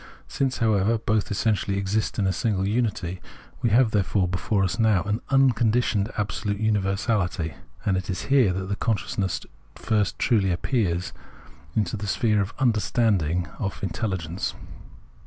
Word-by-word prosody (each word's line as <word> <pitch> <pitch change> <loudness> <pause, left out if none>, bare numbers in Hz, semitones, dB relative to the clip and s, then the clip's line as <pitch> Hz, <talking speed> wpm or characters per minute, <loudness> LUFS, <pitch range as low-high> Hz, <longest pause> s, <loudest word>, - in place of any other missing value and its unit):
Since, 135 -2 -1
however, 110 -1 +2
both 110 -1 0
essentially 100 -1 0
exist 100 +2 -1
in 100 - +1
a 95 - +2
single 100 -4 0
unity, 100 -5 -1 0.4
we 120 - +2
have 115 +1 +4
before 95 -3 +1 0.3
us 95 +5 -1
now 110 -6 +3 0.2
unconditioned 120 -5 +2
absolute 100 0 -2
universality; 100 -5 0 0.3
and 95 - +2
it 95 +1 -3
is 95 - -2
here 135 -8 +4
that 95 +2 -3
consciousness 100 -3 -1 0.3
first 105 -3 0
truly 100 -7 +2
passes 90 -4 -1 0.6
into 105 -1 0
the 105 0 -5
sphere 105 0 +2
of 100 - -3
Understanding, 105 -8 +1
of 100 -2 -4
Intelligence. 95 -3 -2
105 Hz, 130 wpm, -25 LUFS, 95-110 Hz, 0.6 s, have